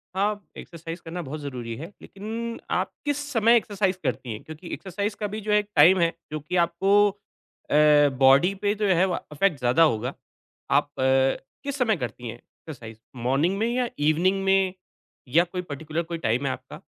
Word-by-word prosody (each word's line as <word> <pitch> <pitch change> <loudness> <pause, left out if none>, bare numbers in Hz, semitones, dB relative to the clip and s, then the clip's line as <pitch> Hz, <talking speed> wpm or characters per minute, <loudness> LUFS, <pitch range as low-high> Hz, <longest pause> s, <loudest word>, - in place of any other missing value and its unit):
हाँ, 205 +1 0
एक्सरसाइज़ 170 0 -8
करना 175 +2 -5
बहुत 150 +1 -6
ज़रूरी 125 -5 -6
है, 160 +4 -7
लेकिन 225 +4 -6
आप - - 0
किस 290 -1 0
समय 230 -1 +4
एक्सरसाइज़ 195 -4 -1
करती 120 - -2
हैं? 105 - -9
क्योंकि 160 +3 -10
एक्सरसाइज़ 200 +2 -3
का 210 - -1
भी 215 +2 -6
जो 210 +1 -3
है 210 - +5
एक 205 0 -6
टाइम 175 +5 +7
है, 170 -1 +2 0.2
जो 155 - -3
कि 150 +5 -5
आपको 195 +4 +3 0.6
अ, 150 -1 +5
बॉडी 135 +8 +6
पे 205 +1 0
जो 210 -1 0
है 185 0 +4
वा 180 - -1
अफ़ेक्ट 155 +1 +1
ज़्यादा 125 +7 +4
होगा। 125 -3 +1 0.6
आप - - +4
अ, - - +1 0.6
किस 280 0 -4
समय 225 -7 +2
करती 125 -2 -6
हैं 115 - -6
एक्सरसाइज़, 120 -6 -12 0.2
मॉर्निंग 135 +10 +1
में 225 +2 +1
या 250 -1 0
ईवनिंग 175 +6 +2
में 190 -1 +3 0.5
या 165 +7 +4
कोई 180 +1 -5
पर्टिक्युलर 155 +1 -4
कोई 170 0 -5
टाइम 125 -1 0
है 130 - +1
आपका? - - -9
170 Hz, 190 wpm, -25 LUFS, 145-200 Hz, 0.6 s, टाइम